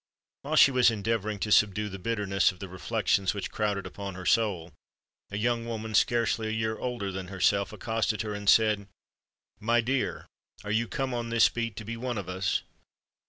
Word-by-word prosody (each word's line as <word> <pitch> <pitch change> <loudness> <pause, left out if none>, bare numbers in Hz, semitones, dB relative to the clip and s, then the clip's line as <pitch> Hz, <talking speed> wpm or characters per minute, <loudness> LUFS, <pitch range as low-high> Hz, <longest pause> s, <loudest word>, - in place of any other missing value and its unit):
While - - -2
she 135 - +7
was 125 -2 +5
endeavouring 110 -1 -1
to 105 - -2
subdue 105 0 +3
the 95 -1 -7
bitterness 100 -2 +1
of 90 - -15
the 95 - -7
reflections 95 +1 0
which 100 - -4
crowded 105 -2 -1
upon 100 -2 -7
her 90 0 -8
soul, 95 -8 +1 0.6
a 100 - -4
young 115 +1 0
woman, 110 -1 -5
scarcely 115 0 +2
a - - -2
year 110 0 -1
older 115 -5 -3
than 95 -1 -5
herself, 100 +1 +1
accosted 110 -2 -1
her, 105 -1 -4
and 105 -1 -1
said, 105 -3 +4 0.7
"My 115 +2 +2
dear, 130 +3 -1 0.4
are 105 - -4
you 115 +2 +1
come 135 0 -2
on 120 -1 -3
this 115 -1 +5
beat 115 -3 -3
to 110 - -7
be 115 +2 -5
one 120 -1 -3
of 100 -3 -5
us?" 95 +1 -1
110 Hz, 190 wpm, -28 LUFS, 100-115 Hz, 0.7 s, she